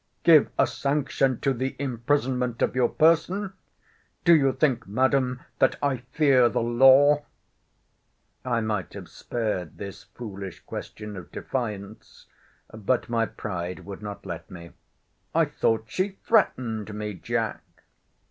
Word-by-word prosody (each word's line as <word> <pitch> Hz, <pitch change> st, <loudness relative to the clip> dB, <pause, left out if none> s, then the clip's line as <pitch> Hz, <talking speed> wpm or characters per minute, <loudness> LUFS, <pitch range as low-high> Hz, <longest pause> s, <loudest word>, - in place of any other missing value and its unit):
Give 165 Hz, -3 st, +6 dB
a -, -, +5 dB
sanction 135 Hz, -2 st, 0 dB
to 135 Hz, -, +2 dB
the 130 Hz, +2 st, -3 dB
imprisonment 125 Hz, -1 st, -1 dB
of -, -, 0 dB
your 125 Hz, -2 st, +3 dB
person! 185 Hz, +5 st, +2 dB, 0.7 s
Do 170 Hz, -, +7 dB
you 135 Hz, -3 st, +4 dB
think, 130 Hz, -6 st, 0 dB
Madam, 130 Hz, +3 st, +1 dB, 0.2 s
that 130 Hz, -, +4 dB
I 140 Hz, -2 st, 0 dB
fear 135 Hz, -6 st, +4 dB
the -, -, -1 dB
law? 135 Hz, +5 st, +5 dB, 1.2 s
I 120 Hz, -2 st, 0 dB
might 105 Hz, -5 st, -2 dB
have -, -, -8 dB
spared 105 Hz, -8 st, -4 dB
this 100 Hz, -1 st, -8 dB
foolish 100 Hz, -6 st, -8 dB
question 105 Hz, -1 st, -8 dB
of 90 Hz, -3 st, -10 dB
defiance: 110 Hz, -4 st, -5 dB, 0.5 s
but 110 Hz, +4 st, -1 dB
my 115 Hz, -1 st, +1 dB
pride 90 Hz, -2 st, -5 dB
would 100 Hz, 0 st, -8 dB
not 105 Hz, -1 st, -7 dB
let 85 Hz, -4 st, -7 dB
me. 85 Hz, -2 st, -10 dB, 0.6 s
I -, -, +5 dB
thought 110 Hz, -1 st, 0 dB
she 190 Hz, -, -2 dB
threatened 115 Hz, -, +1 dB
me, 105 Hz, 0 st, -4 dB
Jack. 90 Hz, -, -2 dB
120 Hz, 130 wpm, -26 LUFS, 105-135 Hz, 1.2 s, Do